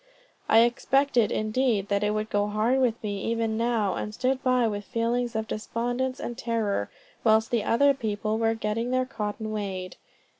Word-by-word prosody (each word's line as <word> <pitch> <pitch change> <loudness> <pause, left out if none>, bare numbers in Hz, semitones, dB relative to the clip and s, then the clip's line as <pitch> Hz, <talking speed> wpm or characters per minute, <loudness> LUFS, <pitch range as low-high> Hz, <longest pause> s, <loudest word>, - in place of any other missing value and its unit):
I 225 - +7
expected 240 0 +2
indeed 215 -2 0
that 200 0 +1
it 210 - +2
would 215 0 -3
go 205 0 +1
hard 220 +5 +1
with 240 -3 0
me 205 -2 -3
even 230 -1 0
now, 225 -4 +1
and 210 +3 -4
stood 260 +2 0
by 255 -3 +3
with 205 -1 -3
feelings 235 +2 -1
of 220 0 -2
despondence 245 +4 -2
and 240 - -4
terror, 225 - -1 0.3
whilst 220 0 +3
the 235 -3 +1
other 280 +6 +4
people 215 -3 -2
were 225 0 +2
getting 225 +2 -2
their 255 0 +1
cotton 215 -2 -4
weighed. 195 -3 -4
225 Hz, 175 wpm, -26 LUFS, 210-245 Hz, 0.3 s, I